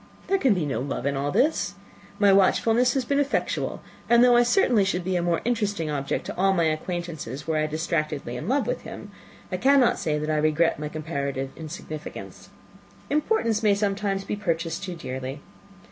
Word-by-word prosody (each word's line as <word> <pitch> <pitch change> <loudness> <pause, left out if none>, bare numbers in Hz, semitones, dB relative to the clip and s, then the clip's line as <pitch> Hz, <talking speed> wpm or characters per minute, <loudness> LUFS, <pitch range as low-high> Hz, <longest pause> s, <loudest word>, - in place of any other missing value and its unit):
There 390 0 +1
can 260 - +3
be 175 -4 -1
no 130 -5 -2
love 135 -2 -4
in 140 0 0
all 140 +1 -1
this. 245 - +1 0.4
My 200 -2 +5
watchfulness 225 +6 +3
has 265 -2 0
been 280 +3 +1
effectual; 285 0 -1 0.3
and 235 0 +6
though 245 -1 +6
I - - +6
should 240 - +2
certainly 245 - +4
be 185 -1 -1
a 175 - +1
more 170 -1 0
interesting 205 -9 -1
object 140 -2 -2
to - - -5
all 195 +1 +3
my 170 -3 +2
acquaintance, 155 -4 -3
were 160 -1 0
I 155 0 +1
distractedly 155 -5 -2
in 125 - -5
love 275 +3 +1
with - - -2
him, - - -9 0.4
I - - -1
cannot 270 -2 +4
say 150 -2 0
that 150 +1 -2
I 155 - +1
regret 155 +2 +2
my 150 0 -4
comparative 140 -4 -3
insignificance. 155 -1 -8 0.6
Importance 290 - +1
may 210 -2 +4
sometimes 200 -1 -1
be - - -2
purchased 165 -3 -2
too 180 -3 -5
dearly. 130 -3 -5
175 Hz, 190 wpm, -25 LUFS, 155-225 Hz, 0.6 s, and